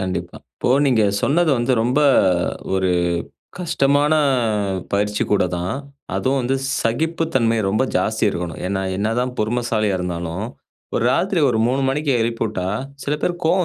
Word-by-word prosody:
கண்டிப்பா. 95 -1 -4 0.2
இப்போ - - -1 0.2
நீங்க 120 -5 +3 0.2
சொன்னது 165 +3 +3
வந்து 120 +2 +1
ரொம்ப 125 +5 +1 0.7
1 95 -1 +1 0.7
கஷ்டமான 145 -3 +2 0.8
பயிற்சி 105 +1 0
கூட 100 - +3
தான். 90 +5 -2 0.4
அதுவும் 135 +1 +1
வந்து 130 +2 0 0.3
சகிப்பு 160 +8 0
தன்மை 115 -3 +2
ரொம்ப 110 +6 +1
ஜாஸ்தி 110 0 0
இருக்கணும். 85 -3 -4
ஏன்னா, 95 0 -1 0.2
என்ன 105 +2 0
தான் 125 0 -2
பொறுமைசாலியா 110 -3 0
இருந்தாலும், 85 +3 -3 0.5
ஒரு - - +1
ராத்திரி 185 -2 +1
ஒரு 110 - 0
3 135 +2 0
மணிக்கு 140 +1 0
எழுப்பி 115 0 -2
வுட்டா 95 -4 -3 0.4
சில 145 - -1
பேருக்கு 175 -1 -2
கோபம் 180 +3 +3
120 Hz, 145 wpm, -20 LUFS, 100-140 Hz, 0.8 s, நீங்க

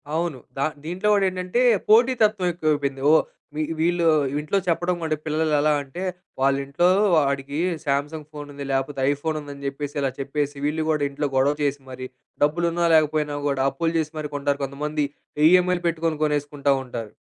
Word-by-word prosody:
అవును. 165 -3 -1 0.2
ద - - -4 0.3
దీంట్లో 180 +5 -2
కూడా 200 -1 +3
ఏంటంటే 185 +5 -1 0.3
పోటీతత్వం 220 -4 +4
ఎక్కువైపోయింది 145 -5 -1
ఓహ్! 160 - +5 0.3
వీ 155 - 0 0.2
వీళ్ళు 170 +1 +1 0.3
ఇంట్లో 150 +6 -1
చెప్పడం 175 +1 +1
కూడా 155 -1 0
పిల్లలు 155 0 0
ఎలా 150 +1 +3
అంటే, 140 +7 -7 0.4
వాళ్ళ 135 0 +4
ఇంట్లో 140 +6 +2 0.3
వాడికి 140 -1 0 0.3
సామ్‌సంగ్ 145 +2 -2
ఫోన్ 145 -1 -7
ఉంది 140 0 -7
లేకపోతే 135 +1 -1
ఐఫోన్ 155 +2 -2
ఉందని 140 -1 -9
చెప్పేసి, 140 +1 -5
ఇలా 135 -1 0
చెప్పేసి 145 +1 -2
వీళ్ళు 155 +1 -1
కూడా 150 -2 0
ఇంట్లో 145 +1 -2
గొడవ 135 +2 +3
చేసి 140 -1 -1
మరి, 130 0 -6 0.4
డబ్బులు 160 +4 +2
ఉన్నా 170 0 +1
లేకపోయినా 150 -1 +1
కూడా 140 -2 0
అప్పులు 165 +2 -1
చేసి 155 -1 -2
మరి 150 -1 -5
కొంటారు 145 0 -1
కొంతమంది. 150 +2 -2 0.4
ఈఎమ్ఐలు 180 0 +3
పెట్టుకొని 165 -1 -1
కొనేసుకుంటా 145 -1 0
ఉంటారు. 115 -4 -7
150 Hz, 165 wpm, -23 LUFS, 140-165 Hz, 0.4 s, ఓహ్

